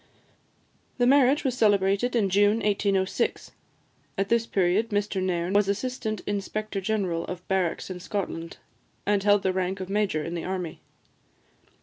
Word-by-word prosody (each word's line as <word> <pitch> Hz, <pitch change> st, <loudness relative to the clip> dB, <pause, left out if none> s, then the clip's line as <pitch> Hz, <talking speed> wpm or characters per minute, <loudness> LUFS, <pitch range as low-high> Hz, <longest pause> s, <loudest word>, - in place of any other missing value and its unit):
The 245 Hz, -, +3 dB
marriage 275 Hz, +2 st, +4 dB
was 260 Hz, -4 st, 0 dB
celebrated 205 Hz, +1 st, +2 dB
in 200 Hz, -5 st, +2 dB
June 205 Hz, +2 st, +4 dB
1806. 200 Hz, -2 st, 0 dB, 0.7 s
At 195 Hz, 0 st, -1 dB
this 230 Hz, -1 st, +2 dB
period, 195 Hz, +4 st, +1 dB
Mr 205 Hz, -2 st, -1 dB
Nairn 180 Hz, 0 st, -1 dB
was 205 Hz, -1 st, +3 dB
Assistant 220 Hz, +1 st, -2 dB
Inspector 205 Hz, 0 st, -3 dB
General 190 Hz, -5 st, -1 dB
of 180 Hz, 0 st, -7 dB
Barracks 190 Hz, -1 st, -1 dB
in 180 Hz, -, -6 dB
Scotland, 175 Hz, -3 st, -4 dB, 0.5 s
and 205 Hz, -1 st, +2 dB
held 205 Hz, 0 st, +3 dB
the 190 Hz, -, +1 dB
rank 190 Hz, +1 st, -1 dB
of 185 Hz, 0 st, -6 dB
major 200 Hz, -7 st, 0 dB
in 165 Hz, -, -5 dB
the 170 Hz, -, -4 dB
army. 180 Hz, -3 st, -4 dB
200 Hz, 145 wpm, -26 LUFS, 185-215 Hz, 0.7 s, marriage